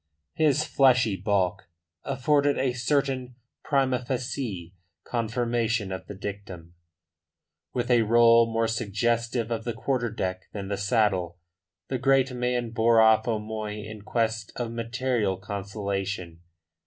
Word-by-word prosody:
His 150 -1 +2
fleshy 125 -8 +3
bulk 95 -2 -1 0.3
afforded 145 +2 +1
a 130 -2 +1
certain 130 0 -1 0.3
prima 130 -3 +1
facie 120 -8 -4 0.3
confirmation 115 -2 -1
of 95 - -6
the 105 - -7
dictum. 95 -4 -7 1.0
With 125 0 -1
a 120 -1 +5
roll 115 +1 +5
more 115 0 +1
suggestive 115 +2 -1
of 115 -1 -2
the 120 0 -3
quarter 120 +1 -1
deck 95 -4 -3
than 100 -2 -5
the 100 - 0
saddle, 100 -5 +1 0.5
the 130 - -2
great 135 0 +3
man 125 -1 -1
bore 115 0 +4
off 110 0 +5
O'Moy 110 -1 -3
in 110 0 -9
quest 110 0 -1
of 120 -2 -3
material 115 -3 -1
consolation. 100 -3 -4
115 Hz, 125 wpm, -26 LUFS, 100-125 Hz, 1.0 s, a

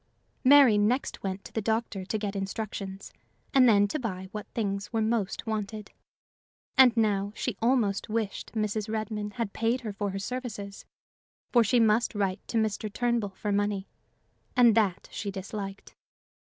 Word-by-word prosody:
Mary 265 -5 +7
next 235 +6 0
went 195 0 -4
to - - -11
the 220 - -1
doctor 220 -2 -1
to 195 +4 -2
get 205 -1 -3
instructions, 195 -1 -5 0.4
and 255 -2 +7
then 205 -2 +5
to 305 - -3
buy 190 -6 -4
what 210 0 -6
things 200 -3 -2
were 225 - 0
most 220 -3 -1
wanted. 215 -1 -4 0.8
And 250 -3 +7
now 205 -2 +1
she 250 - -2
almost 225 -5 +1
wished 220 -2 -3
Mrs. 215 -1 -1
Redmain 215 -1 -3
had 230 -5 -3
paid 230 +3 0
her 215 -4 -5
for 200 0 -2
her 195 - -4
services, 210 -2 -5 0.7
for 240 -2 +5
she 235 +3 +3
must 225 0 +3
write 195 -1 0
to 230 - -1
Mr. 215 -1 -1
Turnbull 235 -4 -1
for 210 - -3
money, 205 -1 0 0.7
and 240 -3 +6
that 205 -5 +1
she 205 - -4
disliked. 195 0 -6
215 Hz, 160 wpm, -28 LUFS, 200-230 Hz, 0.8 s, Mary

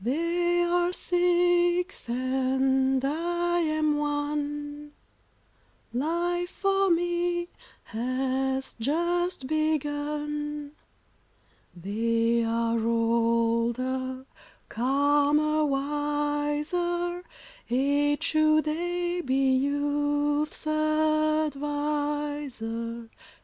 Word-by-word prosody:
They 345 +6 +1
are 350 0 +1
six, 355 -2 +1
and 265 +1 +1
I 345 +4 0
am 310 -2 +1
one, 295 0 -3 1.0
Life 345 +6 -1
for 390 0 +2
me 345 0 0 0.3
has 265 +3 -2
just 345 +4 0
begun. 295 0 -2 1.0
They 230 +5 0
are 230 0 0
older, 230 +3 0 0.4
calmer, 290 +4 +2
wiser: 295 +5 -1 0.5
Age 285 +4 +1
should 310 -1 +3
aye 350 +2 -1
be 265 0 +2
youth's 290 +2 0
adviser. 295 -6 -1
295 Hz, 60 wpm, -27 LUFS, 265-330 Hz, 1.0 s, should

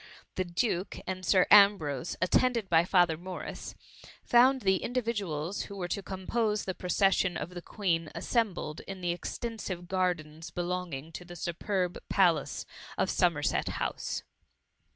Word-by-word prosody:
The 185 - 0
duke 180 +1 -1
and 185 0 -4
Sir 185 -1 +4
Ambrose, 200 -10 +5
attend 250 +6 +3
ed 215 -4 -4
by 165 0 +5
Father 175 -4 +3
Morris, 185 +2 -7 0.5
found 255 +2 +5
the 190 -2 +3
individuals 205 -9 -2
who 200 - -9
were 180 -3 -3
to 200 - -2
compose 210 +3 -1
the 185 - -2
procession 185 -1 +2
of 170 - -5
the 175 -1 -7
Queen 170 -5 -1
assembled 185 -4 -1
in 195 -1 -6
the 175 -1 0
extensive 185 -1 -5
gardens 170 -4 -1
be 175 - -3
longing 175 -4 -4
to 180 - -8
the 175 0 -10
superb 180 +2 -2
palace 170 -7 +2 0.3
of - - +1
Somerset - - +1
House. - - -3
185 Hz, 145 wpm, -30 LUFS, 170-200 Hz, 0.5 s, Ambrose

